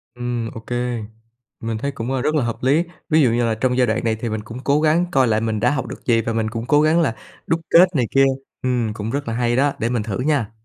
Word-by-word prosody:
Ừm, 120 -2 -3
ô - - -7
kê. 120 0 -3 0.6
Mình 115 -1 -3
thấy 140 +6 -2
cũng, 125 -2 -5
ơ, 135 -1 0
rất 155 +4 0
là 150 - +2
hợp 115 -1 -2
lý. 145 +6 +3 0.3
Ví 160 -1 +4
dụ 130 - +4
như 120 +1 +1
là 115 -1 0
trong 125 +3 0
giai 125 -1 +3
đoạn 110 - 0
này 115 -1 +1
thì 115 +1 -4
mình 110 0 -3
cũng 115 +3 -8
cố 145 +2 +2
gắng 160 +3 +3
coi 135 -6 +3
lại 110 -1 +1
mình 110 -1 -1
đã 120 +4 +2
học 140 -2 -2
được - - -9
gì 115 -2 +3
và 115 +1 -2
mình 110 -1 -1
cũng 115 +1 -5
cố 145 +1 +4
gắng 155 +2 +3
là 135 -8 0 0.3
đúc 165 - +1
kết 180 +1 +6
này 125 -4 +2
kia. 135 0 +5 0.4
Ừm, 120 -4 0
cũng 105 +1 -5
rất 140 +1 -3
là 115 - -2
hay 120 0 0
đó, 140 +2 +2
để 115 - 0
mình 120 -3 -1
thử 105 0 -4
nha. 130 -5 0
120 Hz, 285 wpm, -21 LUFS, 115-140 Hz, 0.6 s, kết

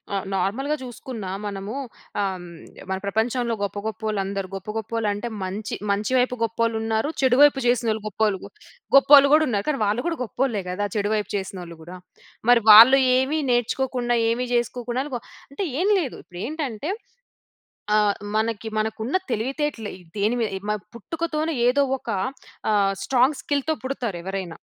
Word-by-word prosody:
ఆహ్, 195 - -2
నార్మల్‌గా 225 +11 0
జూసుకున్న 245 -3 -7 0.2
మనము 200 +3 -5 0.5
ఆహ్, 190 -2 -2 0.5
మన 190 - 0
ప్రపంచంలో 230 +3 0
గొప్ప, 200 0 -3
గొప్పోళ్ళు 220 -2 -3
అందరూ 195 -1 -3
గొప్ప 195 +2 -7
గొప్పోళ్ళు 225 0 -2
అంటే 210 +4 -4 0.2
మంచి 195 +3 -4 0.2
మంచి 205 +4 -1
వైపు 250 0 +2
గొప్పోళ్ళు 230 0 0
ఉన్నారు. 225 +5 0
చెడు 255 -1 +4
వైపు 290 -2 +6
జేసినోళ్ళు 230 -3 +1
గొప్పళ్ 210 -1 0 0.6
గొప్పోళ్ళు 280 0 +8
గూడా 310 0 +6
ఉన్నారు. 205 -4 -1
కానీ 285 - 0
వాళ్ళు 215 +5 0
గూడా 335 -1 -1
గొప్పోళ్ళే 240 -3 -1
గదా! 205 +3 -1
చెడు 205 0 0
వైపు 210 -1 -2
చేసినోళ్ళు 180 -4 -5
కూడా. 175 +3 -9 0.5
మరి 240 -1 +7
వాళ్ళు 235 +6 +10 0.2
ఏమి 270 +4 +1
నేర్చుకోకుండా 245 0 0
ఏమి 240 +2 0
చేసుకోకుండా 240 +1 -1
వ 240 - -2 0.3
అంటే 280 +8 -3 0.2
ఏం 380 - +2
లేదు. 275 -8 -3
ఇప్పుడు 175 - -11
ఏంటంటే 290 - -3 1.0
ఆహ్, 210 -1 +3 0.2
మనకి 220 0 -1
మనకున్న 220 +6 -2
తెలివితేటలు 255 -1 -2 0.3
దేని 210 +4 +1
మీద 220 - -1 0.4
పుట్టుకతోనే 320 +5 -2
ఏదో 265 +3 +3 0.2
ఒక 240 - -11 0.6
ఆహ్, 200 -2 +3
స్ట్రాంగ్ 265 +2 +3
స్కిల్‌తో 285 +2 0
పుడతారు 245 -8 -3
ఎవరైనా. 190 -3 -5
230 Hz, 145 wpm, -24 LUFS, 205-260 Hz, 1.0 s, వాళ్ళు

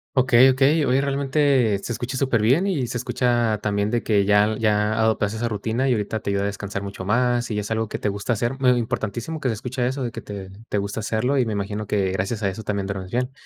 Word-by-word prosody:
Okey 130 0 +6
okey. 140 +4 +3
Oye, 130 +2 +2
realmente 140 -5 +2
se - - -5
escucha 125 +3 -4
superbién 130 - +2
y 145 -10 0
se 125 +1 -4
escucha 120 -4 +1
también, 100 0 0
de 120 +1 -1
que 100 -3 +2
ya 105 +1 +3
ya 105 -1 +2
adoptaste 110 -1 +1
esa 120 +1 -1
rutina 110 +5 -1
y 125 - +4
ahorita 110 0 -2
te 100 - -5
ayuda 100 0 0
a - - 0
descansar 100 0 -4
mucho 100 -1 -6
más 120 +4 +1
y 105 - -2
es 105 +1 -4
algo 110 -1 -1
que - - -3
te 105 - -1
gusta 100 +4 -2
hacer. 120 +3 -1
Mm, 135 - -1
eh, 125 - +5
importantísimo 120 +6 -3
que 135 -4 -1
se 110 - -1
escucha 125 +3 -2
eso, 130 +1 -2
de 120 - -3
que 115 - -7
te 100 -2 -8 0.2
te - - -1
gusta 100 +2 -3
hacerlo 115 +6 0
y 120 - +1
me 110 - -2
imagino 105 +1 -3
que 95 -3 0
gracias 100 +4 -2
a 100 - +2
eso 95 +4 -6
también 100 -2 -2
duermes 95 -2 -5
bien. 125 +3 -1
110 Hz, 250 wpm, -23 LUFS, 105-125 Hz, 0.2 s, Okey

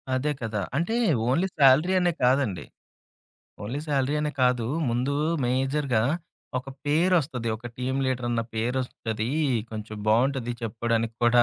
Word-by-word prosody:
అదే 140 +4 0
కదా! 110 -3 -2 0.2
అంటే 170 +9 0 0.3
ఓన్లీ 170 +9 +2
సాలరీ 145 +7 +6
అనే 175 -1 +2
కాదండి. 125 -7 +2 1.0
ఓన్లీ 125 +8 -3
సాలరీ 140 0 +1
అనే 150 0 -1
కాదు. 125 -2 +2 0.2
ముందు 125 +4 0 0.3
మేజర్‌గా 130 -1 +1 0.6
ఒక 130 - -9 0.2
పేరొస్తది. 155 -6 +2
ఒక 120 +2 -9
టీమ్ 130 +2 -2
లీడరన్న 120 -2 0
పేరొస్తది. 115 -1 -2 0.4
కొంచెం 110 -1 -6
బావుంటది 120 +2 +2
చెప్పుకోవడానికి 115 0 -1
కూడా 120 0 +6
125 Hz, 120 wpm, -26 LUFS, 115-140 Hz, 1.0 s, సాలరీ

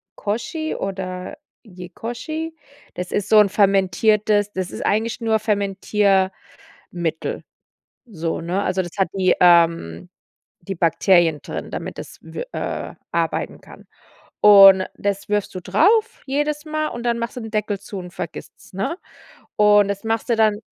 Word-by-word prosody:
Koji 240 +10 -3
oder 185 +5 -5 0.3
Yekoji. 240 - -7 0.4
Das 180 0 -6
ist 205 0 -1
so 215 - +6
'n 205 -2 +5
Fermentiertes 205 +2 +2
das 185 -1 -4
ist - - -6
eigentlich 220 +3 0
nur 225 -1 +1
Fermentiermittel 200 -2 0 1.6
so, 165 -7 -4
ne? 180 +4 -2
Also, 185 0 0
das 175 - -8
hat 190 - +2
die 190 -2 +2
ähm, 165 - +3 0.5
die 190 +2 -6
Bakterien 165 -1 +3
drin, - - -7
damit - - -6
das - - -9
w 480 - -7
äh, - - -4 0.2
arbeiten - - -2
kann. - - -16 0.6
Und 195 -2 +8
das 200 0 -3
wirfst 205 -2 -1
du 185 - -5
drauf 415 - +2
jedes 295 +2 -1
Mal, 310 0 -2
und 240 0 -7
dann 235 -1 0
machst 235 +2 -4
du - - -4
den 225 -1 -8
Deckel 210 -1 -1
zu 200 - -8
und 180 -1 -8
vergisst's, 175 0 -9
ne? 195 - -3 0.6
Und 205 -1 +5
das 200 0 -3
machst 225 +1 -2
du - - +4
dann 215 -2 +3
205 Hz, 150 wpm, -21 LUFS, 185-225 Hz, 1.6 s, Und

